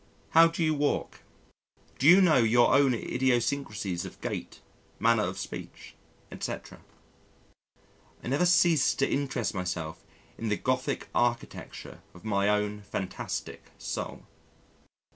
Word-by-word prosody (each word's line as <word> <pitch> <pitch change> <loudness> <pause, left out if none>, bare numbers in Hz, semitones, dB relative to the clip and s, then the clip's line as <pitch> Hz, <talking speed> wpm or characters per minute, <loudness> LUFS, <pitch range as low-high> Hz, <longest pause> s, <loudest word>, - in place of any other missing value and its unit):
How 165 +1 +7
do 165 0 -2
you 155 -1 +2
walk? 145 -1 -1 0.8
Do 135 - +3
you 180 +4 +9
know 175 -4 +5
your 120 +1 +4
own 135 -2 +4
idiosyncrasies 120 -7 -1
of - - -10
gait, - - -5 0.4
manner 115 -1 +3
of 95 -1 -2
speech, 95 - -8 0.4
etc.? - - -6 1.4
I - - -4
never 145 +7 +2
cease 170 -4 +4
to 135 - +1
interest 135 -5 -1
myself 90 -4 -4 0.4
in 115 - -2
the 105 - +1
Gothic 130 0 -1
architecture 120 0 -2
of 90 - -15
my 100 -1 +1
own 105 0 0
fantastic 100 -2 -5
soul. - - -5
120 Hz, 125 wpm, -28 LUFS, 105-140 Hz, 1.4 s, you